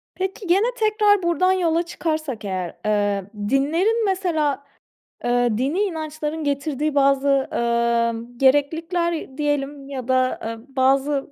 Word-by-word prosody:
Peki 380 +1 -4
gene 390 +6 +3
tekrar 420 -3 +3
buradan 345 +2 +2
yola 340 -2 +1
çıkarsak 310 -9 -3
eğer, 185 -3 -3
eee, 205 -2 +1 0.2
dinlerin 340 +12 +2
mesela, 320 -8 0 0.6
eee, 245 0 +2
dini 275 - 0
inançların 315 -4 -3
getirdiği 285 +1 -1
bazı, 275 -1 +3
ımm, 235 0 0
gereklilikler 320 +3 +1
diyelim 285 -1 -2
ya 260 -3 -6
da, 255 0 +1
ııı, 225 +1 -6
bazı 270 +2 +1
285 Hz, 115 wpm, -22 LUFS, 255-340 Hz, 0.6 s, gene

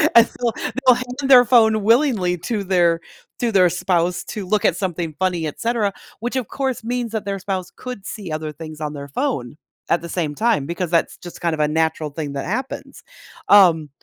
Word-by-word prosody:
And 235 0 +8
so, 240 -2 -2 0.4
they'll 250 - +8
hand 255 +3 -4
their 250 -2 +8
phone 220 -3 +4
willingly 225 -7 +3
to 210 +3 -2
their 175 -3 +3 0.4
to 235 -2 0
their 185 -3 +5
spouse 175 0 0
to 205 -3 -6
look 210 +3 +1
at - - +3
something 175 -4 -3
funny, 180 -3 0
etcetera, 215 +4 -1 0.3
which, 240 +4 -3
of 255 -5 -1
course, 265 -4 -2
means 240 -1 -2
that 220 -2 -3
their 195 -1 -3
spouse 190 -1 -4
could 250 -6 -8
see 195 -7 -6
other 155 0 -3
things 155 0 -10
on 150 - -2
their 140 -1 -7
phone 140 - -2 0.3
at 170 - +2
the 170 - -8
same 155 -4 -2
time 220 -7 +1
because 170 +1 -3
that's 170 -1 +1
just 175 - -11
kind 170 -2 0
of 155 - -4
a 150 - +3
natural 160 0 0
thing 145 -1 -5
that 140 - -4
happens. 255 +8 -5 0.4
Um, 170 -7 +6
185 Hz, 200 wpm, -21 LUFS, 160-230 Hz, 0.4 s, And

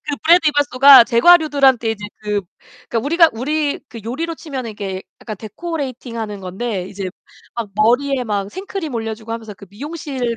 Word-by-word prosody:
그 295 -1 -4
브레드 335 0 +5
이발소가 280 -3 +7
제과류들한테 270 -2 +4
이제 210 -1 -7
그 210 -1 -1 0.5
그러니까 235 - -1
우리가 330 +2 +4
우리 290 +5 -1
그 230 0 -9
요리로 325 +9 -3
치면은 265 -7 -6
이렇게 195 -3 -5 0.2
약간 215 -2 -7
데코레이팅하는 230 - -6
건데 190 +1 -4
이제 195 -1 -5 0.4
막 235 -3 -4
머리에 250 +5 +2
막 200 -3 -2
생크림 375 - -6
올려주고 225 0 -5
하면서 220 -2 -7
그 200 - -14
미용실 265 -1 -4
240 Hz, 395 characters per minute, -19 LUFS, 215-290 Hz, 0.5 s, 이발소가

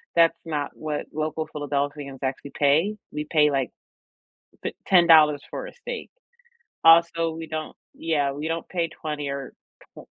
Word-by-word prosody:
That's 165 -1 +5
not 150 -3 -2
what 150 -1 -4
local 155 +1 -2
Philadelphians 145 -1 -3
actually 135 +1 -4
pay. 155 +9 +3 0.2
We 150 0 -4
pay, 150 -2 +4
like, 135 -3 0 0.9
t - - -3
ten 180 -3 +6
dollars 150 -3 +7
for - - -5
a - - -11
steak. 485 -1 -7 0.8
Also, 165 0 +6
we 165 0 -6
don't 155 0 -5 0.2
yeah, 145 -4 0
we 150 +3 -4
don't 165 0 -3
pay 170 -2 -1
20, 150 -3 -5
or 140 -1 -5 0.5
twe - - -11
155 Hz, 155 wpm, -25 LUFS, 145-165 Hz, 0.9 s, dollars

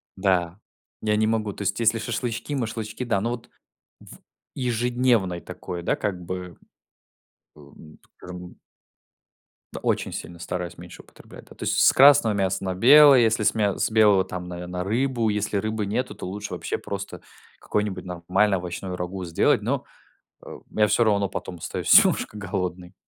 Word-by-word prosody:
Да. 95 -2 0 0.4
Я 105 -1 +1
не 110 0 +2
могу, 110 -2 -1
то - - -9
есть, 100 +3 -1
если 115 0 +2
шашлычки 120 +5 -4
машлычки, 115 -1 -4
да. 115 -5 0
Но 115 +3 -1
вот 120 -2 -7 0.5
в - - -14 0.4
ежедневной 120 -6 0
такой, 90 0 -7
да - - 0
как 100 -4 -3
бы, 90 -1 -7 1.0
о, 70 -1 -16
м, 75 -1 -16 0.2
скажем 90 -1 -10 1.3
Очень - - -1
сильно 85 -1 -8
стараюсь 90 +1 -5
меньше 90 0 -11
употреблять. - - -16
Да, - - -14
то - - -8
есть - - 0
с - - +5
с - - +7
красного 130 -5 +7
мяса 95 -1 -1
на 95 -1 -2
белое, 140 +6 +8
если 110 -2 +2
с - - +3
мя 105 -3 +1
с - - 0
белого 105 -4 +5
там, 90 -1 -7
наверное, 90 0 -5
рыбу. 115 +2 0
Если 105 0 -1
рыбы 110 0 -2
нету, 125 +5 -2
то - - -8
лучше 105 +3 -6
вообще - - -3
просто 100 0 -7 0.4
какое-нибудь 105 -3 -3
нормальное 90 +3 0
овощное 90 +1 -6
рагу 90 +1 -5
сделать, 85 -1 +2
но, - - -1 0.6
э, - - -9 0.2
я 105 0 +4
всё 105 +4 +2
равно 100 -2 +2
потом 95 -2 -6
остаюсь 80 - +4
немножко 105 - -1
голодный. 90 -2 -4
100 Hz, 165 wpm, -24 LUFS, 90-110 Hz, 1.3 s, белое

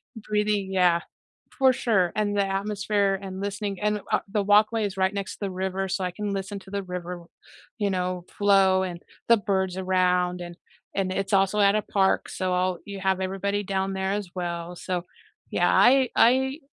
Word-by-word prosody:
breathing 210 -2 -1
Yeah, 180 -3 +3 0.6
for 265 -2 +5
sure, 195 -8 +1
and 205 -1 0
the 200 - +3
atmosphere, 200 0 0
and 190 -1 -6
listening, 200 -1 -3
and 210 -1 0
a - - +2
the 210 -2 +1
walkway 215 +2 +4
is 195 -1 -5
right 190 +1 +1
next 200 -1 -4
to - - -15
the 195 -2 -2
river, 190 +1 -2
so 195 0 -2
I 180 - -1
can 205 +3 -4
listen 195 +1 -4
to 190 - -15
the 200 0 -2
river, 180 -1 -6 0.5
you 205 -3 0
know, 180 -1 -2
flow 195 -2 +4
and 175 -2 -5 0.3
the 235 -1 +6
birds 190 -3 -1
around 180 -1 +1
and 175 0 -7 0.4
and 195 -1 0
it's 195 +1 -2
also 195 +2 +3
at 200 0 +5
a 215 - +2
park, 195 -2 +1
so 185 -1 -2
I'll 180 0 0
you 200 -1 -7
have 190 -1 0
everybody 195 +2 -2
down 195 0 -2
there 190 0 -1
as 205 -3 -3
well, 175 -1 -4
so 180 0 -4 0.5
yeah, - - +2
I 260 0 +5
I, 265 +5 +3
195 Hz, 190 wpm, -25 LUFS, 185-205 Hz, 0.6 s, the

